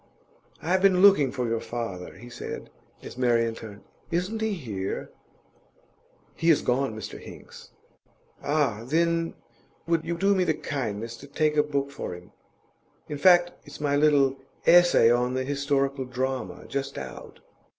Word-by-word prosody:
'I 160 Hz, -, -4 dB
have 185 Hz, +1 st, +3 dB
been 190 Hz, -1 st, +4 dB
looking 170 Hz, -10 st, +6 dB
for 125 Hz, -2 st, -2 dB
your 115 Hz, 0 st, 0 dB
father,' 115 Hz, -8 st, -5 dB
he 120 Hz, -, -12 dB
said, 120 Hz, -, -7 dB, 0.3 s
as 125 Hz, -, -9 dB
Marian 115 Hz, -2 st, +2 dB
turned. 105 Hz, -2 st, -10 dB, 0.3 s
'Isn't 180 Hz, +6 st, -2 dB
he 220 Hz, -1 st, 0 dB
here?' 105 Hz, -, -4 dB, 1.2 s
'He 165 Hz, -, 0 dB
has 160 Hz, -, +4 dB
gone, 125 Hz, -2 st, 0 dB
Mr 110 Hz, -, -7 dB
Hinks.' -, -, -12 dB, 0.7 s
'Ah, 140 Hz, -7 st, 0 dB
then 165 Hz, +5 st, 0 dB, 0.5 s
would 165 Hz, -1 st, +1 dB
you 170 Hz, 0 st, -3 dB
do 195 Hz, +3 st, +3 dB
me 190 Hz, -2 st, +2 dB
the 160 Hz, -3 st, +1 dB
kindness 115 Hz, -4 st, -4 dB
to 140 Hz, -, -12 dB
take 150 Hz, +1 st, 0 dB
a 150 Hz, -, +5 dB
book 140 Hz, -2 st, -2 dB
for 140 Hz, -10 st, -5 dB
him? 90 Hz, 0 st, -14 dB, 0.8 s
In 145 Hz, -1 st, -4 dB
fact, 175 Hz, +1 st, +6 dB
it's -, -, -12 dB
my 145 Hz, -1 st, +1 dB
little 145 Hz, -2 st, +4 dB, 0.3 s
"Essay 175 Hz, -9 st, +6 dB
on 125 Hz, +1 st, +1 dB
the 130 Hz, -, 0 dB
Historical 140 Hz, -1 st, 0 dB
Drama," 130 Hz, +1 st, -3 dB
just 140 Hz, 0 st, -4 dB
out. -, -, -9 dB
140 Hz, 155 wpm, -26 LUFS, 120-165 Hz, 1.2 s, looking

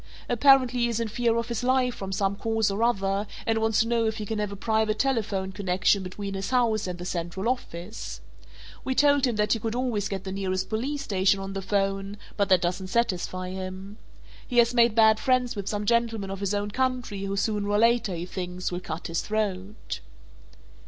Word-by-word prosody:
Apparently 255 Hz, 0 st, +5 dB
he 240 Hz, -, +3 dB
is 230 Hz, -1 st, -1 dB
in 230 Hz, -, -1 dB
fear 230 Hz, +1 st, +1 dB
of 230 Hz, -, -1 dB
his 235 Hz, 0 st, -3 dB
life 255 Hz, -1 st, +2 dB
from 195 Hz, -3 st, -6 dB
some 195 Hz, 0 st, 0 dB
cause 220 Hz, 0 st, 0 dB
or 200 Hz, +3 st, -2 dB
other 200 Hz, -3 st, +1 dB, 0.2 s
and 225 Hz, 0 st, +1 dB
wants 220 Hz, -1 st, +2 dB
to 225 Hz, -, 0 dB
know 230 Hz, -1 st, +2 dB
if 220 Hz, 0 st, -2 dB
he 215 Hz, -, -4 dB
can 220 Hz, +1 st, -3 dB
have 210 Hz, -1 st, -2 dB
a -, -, -5 dB
private 220 Hz, +1 st, 0 dB
telephone 215 Hz, -7 st, 0 dB
connection 190 Hz, 0 st, +1 dB
between 195 Hz, +2 st, -5 dB
his 195 Hz, 0 st, -3 dB
house 230 Hz, -5 st, +2 dB
and 180 Hz, -1 st, -4 dB
the 175 Hz, -, -7 dB
central 180 Hz, +3 st, -3 dB
office. 215 Hz, -5 st, -4 dB, 0.6 s
We 260 Hz, -, -1 dB
told 285 Hz, -1 st, +4 dB
him 240 Hz, -, -1 dB
that 210 Hz, 0 st, +2 dB
he 225 Hz, -, -1 dB
could 225 Hz, +1 st, -3 dB
always 240 Hz, -5 st, -1 dB
get 195 Hz, -2 st, -4 dB
the 190 Hz, -, -5 dB
nearest 185 Hz, -1 st, -2 dB
Police 275 Hz, +6 st, -2 dB
Station 195 Hz, -3 st, +2 dB
on 195 Hz, 0 st, -5 dB
the 195 Hz, -, -3 dB
'phone, 195 Hz, +1 st, -1 dB, 0.2 s
but 200 Hz, -1 st, +1 dB
that 185 Hz, -2 st, +5 dB
doesn't 180 Hz, +2 st, -1 dB
satisfy 185 Hz, -4 st, -1 dB
him. 190 Hz, +2 st, -7 dB, 0.5 s
He 245 Hz, -, -3 dB
has 235 Hz, 0 st, +5 dB
made 235 Hz, -2 st, +4 dB
bad 220 Hz, -1 st, +6 dB
friends 255 Hz, -3 st, +1 dB
with 200 Hz, -2 st, -5 dB
some 205 Hz, 0 st, -2 dB
gentleman 225 Hz, -3 st, +1 dB
of 195 Hz, -, -5 dB
his 200 Hz, 0 st, -1 dB
own 205 Hz, 0 st, -2 dB
country 250 Hz, -5 st, -1 dB
who 195 Hz, 0 st, -2 dB
sooner 205 Hz, 0 st, 0 dB
or 205 Hz, -, +2 dB
later, 230 Hz, -3 st, +3 dB
he 170 Hz, +1 st, -4 dB
thinks, 180 Hz, 0 st, -4 dB
will 175 Hz, -, -2 dB
cut 165 Hz, -2 st, -6 dB
his 165 Hz, 0 st, -1 dB
throat." 210 Hz, -1 st, -3 dB
210 Hz, 215 wpm, -26 LUFS, 195-235 Hz, 0.6 s, bad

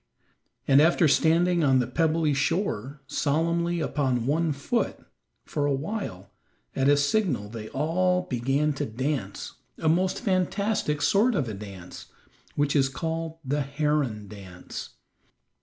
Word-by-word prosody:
And 140 Hz, +1 st, +6 dB
after 165 Hz, +1 st, +4 dB
standing 165 Hz, +4 st, +3 dB
on 135 Hz, -2 st, +4 dB
the 125 Hz, -, +2 dB
pebbly 160 Hz, +3 st, +1 dB
shore 140 Hz, -, -1 dB
solemnly 170 Hz, +5 st, 0 dB
upon 130 Hz, -7 st, 0 dB
one 160 Hz, +4 st, +1 dB
foot, 145 Hz, -, -1 dB, 0.5 s
for 145 Hz, -1 st, -1 dB
a 140 Hz, -, +2 dB
while, 140 Hz, -, -5 dB, 0.4 s
at 135 Hz, +1 st, +2 dB
a 145 Hz, -, +5 dB
signal 145 Hz, -, +1 dB
they 110 Hz, -1 st, -7 dB
all 180 Hz, +5 st, +1 dB
began 135 Hz, +3 st, 0 dB
to -, -, +1 dB
dance 120 Hz, -3 st, -3 dB, 0.2 s
a 160 Hz, -, -2 dB
most 180 Hz, +4 st, +2 dB
fantastic 190 Hz, -5 st, 0 dB
sort 220 Hz, +4 st, +3 dB
of 145 Hz, -8 st, 0 dB
a 110 Hz, -, -4 dB
dance, 95 Hz, -3 st, -9 dB, 0.5 s
which 145 Hz, 0 st, +1 dB
is 135 Hz, -2 st, +3 dB
called 165 Hz, +2 st, -4 dB
"the 145 Hz, +3 st, 0 dB
heron 140 Hz, -6 st, -1 dB
dance." 95 Hz, -3 st, -9 dB
150 Hz, 135 wpm, -26 LUFS, 130-170 Hz, 0.5 s, And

